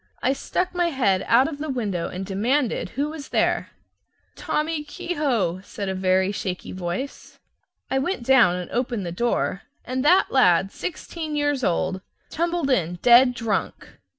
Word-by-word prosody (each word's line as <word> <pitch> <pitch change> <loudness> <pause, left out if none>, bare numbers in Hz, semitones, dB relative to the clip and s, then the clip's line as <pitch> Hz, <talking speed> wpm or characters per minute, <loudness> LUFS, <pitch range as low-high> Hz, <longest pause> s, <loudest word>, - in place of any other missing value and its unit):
I 265 - +3
stuck 360 +6 -2
my 350 -1 +1
head 235 - +1
out 250 +4 +5
of 300 -3 -6
the 310 +1 -4
window 205 -10 -2
and 185 +1 -5
demanded 230 +7 0
who 290 +2 0
was 305 -2 -8
there. - - +1 0.7
"Tommy 305 0 -2
Kehoe," 265 - -1
said 200 0 -5
a - - -1
very 185 +1 +2
shaky 185 -2 -4
voice. 185 +9 -5 0.5
I 265 - +2
went 280 -1 -2
down 235 -8 +5
and 180 -1 -6
opened 240 -5 -2
the 170 - -4
door, 195 -1 -1 0.2
and 255 +1 -2
that 360 +6 +4
lad, 190 -6 +4
sixteen 320 -2 -5
years 290 -2 0
old, 185 +1 0 0.3
tumbled 335 -3 -1
in, 175 -8 +1
dead 245 +1 +7
drunk. 230 -3 -2
245 Hz, 155 wpm, -24 LUFS, 190-295 Hz, 0.7 s, dead